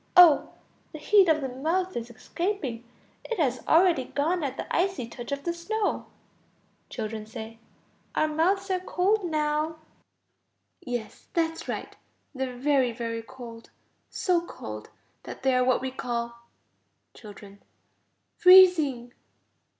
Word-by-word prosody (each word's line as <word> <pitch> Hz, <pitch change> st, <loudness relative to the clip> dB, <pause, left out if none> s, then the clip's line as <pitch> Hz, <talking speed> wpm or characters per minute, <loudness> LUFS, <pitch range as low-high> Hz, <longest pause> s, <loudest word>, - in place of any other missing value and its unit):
Oh! 345 Hz, -5 st, +7 dB, 0.4 s
the -, -, -6 dB
heat 380 Hz, +4 st, +4 dB
of 310 Hz, -1 st, +3 dB
the 270 Hz, -, -2 dB
mouth 330 Hz, +9 st, -2 dB
is 235 Hz, 0 st, -4 dB
escaping, 270 Hz, -, -4 dB, 0.4 s
it 465 Hz, -, -4 dB
has 255 Hz, -6 st, 0 dB
already 330 Hz, -5 st, +4 dB
gone 315 Hz, +6 st, -1 dB
at 270 Hz, -1 st, -3 dB
the -, -, -4 dB
icy 360 Hz, -8 st, 0 dB
touch 240 Hz, +2 st, -9 dB
of 280 Hz, 0 st, -3 dB
the 340 Hz, -, -1 dB
snow. 410 Hz, +5 st, -2 dB, 0.8 s
Children. 215 Hz, -1 st, -5 dB, 0.9 s
Our 310 Hz, -, +2 dB
mouths 375 Hz, +6 st, 0 dB
are 370 Hz, -, +1 dB
cold 375 Hz, +3 st, +1 dB
now. 310 Hz, -1 st, -1 dB, 1.0 s
Yes, 235 Hz, -3 st, -6 dB
that's 325 Hz, -1 st, -1 dB
right. -, -, -5 dB, 0.4 s
They 265 Hz, -1 st, -3 dB
are 250 Hz, -, -9 dB
very, 265 Hz, -2 st, +2 dB
very 230 Hz, -1 st, -4 dB
cold, 230 Hz, -1 st, -11 dB, 0.4 s
so 355 Hz, -2 st, +1 dB
cold 110 Hz, -, -8 dB, 0.3 s
that -, -, -10 dB
they 265 Hz, -1 st, +3 dB
are 255 Hz, 0 st, +3 dB
what 255 Hz, 0 st, +2 dB
we 265 Hz, 0 st, -3 dB
call... 235 Hz, -2 st, -5 dB, 0.7 s
Children. 200 Hz, -2 st, -13 dB, 0.8 s
Freezing. 320 Hz, -10 st, +6 dB
285 Hz, 130 wpm, -27 LUFS, 240-350 Hz, 1.0 s, Oh